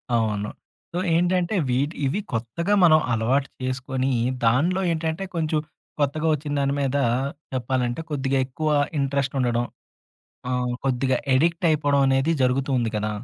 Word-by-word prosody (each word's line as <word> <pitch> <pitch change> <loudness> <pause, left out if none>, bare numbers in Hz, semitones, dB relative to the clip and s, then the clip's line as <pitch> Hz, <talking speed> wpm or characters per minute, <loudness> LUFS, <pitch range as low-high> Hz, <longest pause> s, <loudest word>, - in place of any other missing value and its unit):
అవును. 105 -2 0 0.4
సో, 175 - -1 0.2
ఏంటంటే 180 +3 +1
వీటి 140 +5 0
ఇవి 150 +10 0
కొత్తగా 120 - -1
మనం 155 -2 +7
అలవాటు 130 +5 +1
చేసుకొని, 130 +1 -1 0.3
దాన్లో 165 +11 +3
ఏంటంటే, 160 +3 -2
కొంచెం 155 -1 0 0.4
కొత్తగా 150 +3 0
వొచ్చిన 145 0 -3
దాని 140 0 +1
మీద 135 +1 0 0.6
చెప్పాలంటే, 125 +1 -1
కొద్దిగా 135 -2 0
ఎక్కువ 155 +4 -2 0.3
ఇంట్రెస్టుండడం. 135 -3 0 0.9
ఆహ్, 125 -1 0
కొద్దిగా 130 0 +1 0.2
ఎడిక్టయిపోడం 155 -2 +2
అనేది 135 +4 +2
జరుగుతూంది 125 -2 +1
కదా! 105 0 -1
135 Hz, 120 wpm, -24 LUFS, 125-155 Hz, 0.9 s, మనం